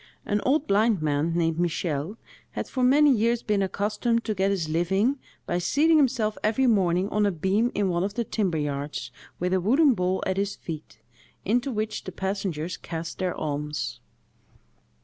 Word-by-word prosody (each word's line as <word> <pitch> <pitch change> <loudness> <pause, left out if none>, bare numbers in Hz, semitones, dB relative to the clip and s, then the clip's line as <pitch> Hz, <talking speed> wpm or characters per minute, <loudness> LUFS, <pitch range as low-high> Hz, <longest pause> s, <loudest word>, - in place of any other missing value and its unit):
An 205 0 0
old 290 +3 +2
blind 210 - +3
man, 155 +2 0
named 165 -1 +1
Michel, 170 +1 -1 0.4
had - - -4
for 260 - -3
many 285 +3 +6
years 235 0 +2
been 210 -2 +1
accustomed 210 +4 0
to 220 - 0
get 195 0 +1
his 190 -5 -1
living 190 - +1 0.3
by 175 - -1
seating 300 - +3
himself 230 -7 +1
every 225 +5 +2
morning 190 -5 +2
on 210 - +1
a 205 - +3
beam 195 +8 +1
in 205 -1 +1
one 175 -1 0
of 200 +1 -3
the 235 - 0
timber 200 -6 -1
yards, 145 -4 -3 0.3
with 180 +1 0
a 190 - +2
wooden 270 - +4
bowl 185 -2 -1
at 190 0 -1
his 200 0 -1
feet, 155 -8 -8 0.5
into 245 +6 +1
which 215 -1 -3
the 185 - -5
passengers 185 -3 -3
cast 165 0 -6
their 185 -1 -1
alms. 150 -1 -3
195 Hz, 175 wpm, -26 LUFS, 170-225 Hz, 0.5 s, many